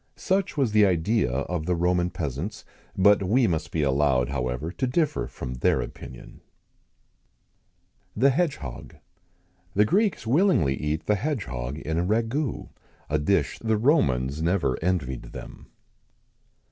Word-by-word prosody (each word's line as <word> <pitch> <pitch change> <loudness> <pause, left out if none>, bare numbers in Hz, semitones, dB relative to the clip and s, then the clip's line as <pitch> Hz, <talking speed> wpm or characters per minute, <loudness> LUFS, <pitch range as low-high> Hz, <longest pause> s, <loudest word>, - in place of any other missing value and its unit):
[XIX - - -12
109] 195 +1 +5
Such 180 - -12
was 135 -6 +2
the 105 -1 +5
idea 90 - +1
of 75 +5 -2
the 90 - +2
Roman 90 +1 +1
peasants; 85 - -5 0.3
but 100 +1 +5
we 115 +7 +3
must 80 -7 -1
be 80 - -1
allowed, 70 -2 +2
however, 65 +3 -2
to 130 +7 -2
differ 150 +3 0
from 65 - -6
their 60 - +1
opinion. - - -9 1.7
THE 135 +6 +4
HEDGEHOG. 135 - -3 0.8
The 105 +2 +5
Greeks 200 - +1
willingly 135 - +3
eat 75 +3 -3
the 105 - +2
hedgehog[XIX 75 - -4
110] 80 - -3
in 80 - 0
a - - +1
ragoût 115 +8 -1 0.4
a 75 - +2
dish 95 +7 0
the 110 -1 0
Romans 75 - +2
never 85 -6 +1
envied 80 -8 -2
them. - - -10
90 Hz, 145 wpm, -25 LUFS, 70-115 Hz, 1.7 s, 109